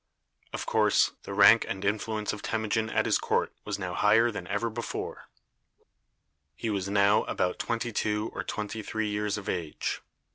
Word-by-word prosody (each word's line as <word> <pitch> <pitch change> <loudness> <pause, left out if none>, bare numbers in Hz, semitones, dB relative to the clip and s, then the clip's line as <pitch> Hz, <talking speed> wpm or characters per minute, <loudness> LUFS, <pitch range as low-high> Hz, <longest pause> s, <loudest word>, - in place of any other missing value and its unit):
Of - - -4
course, - - +3
the 100 - -5
rank 105 +3 +7
and 95 +1 -4
influence 105 +1 -1
of 105 - -7
Temujin 110 0 -1
at - - +1
his - - +3
court - - 0
was 105 -1 -2
now 90 -3 -4
higher 110 +5 +4
than 100 -5 -6
ever 100 +4 -1
before. 115 +1 -5 1.3
He 110 +8 -3
was 100 -1 -2
now 100 +1 +4
about 90 - -1
twenty 115 0 -2
two 105 0 -1
or - - -4
twenty 105 +1 -4
three 110 0 -2
years 105 0 -1
of 100 - -8
age. 85 -4 -3
105 Hz, 170 wpm, -28 LUFS, 100-110 Hz, 1.3 s, rank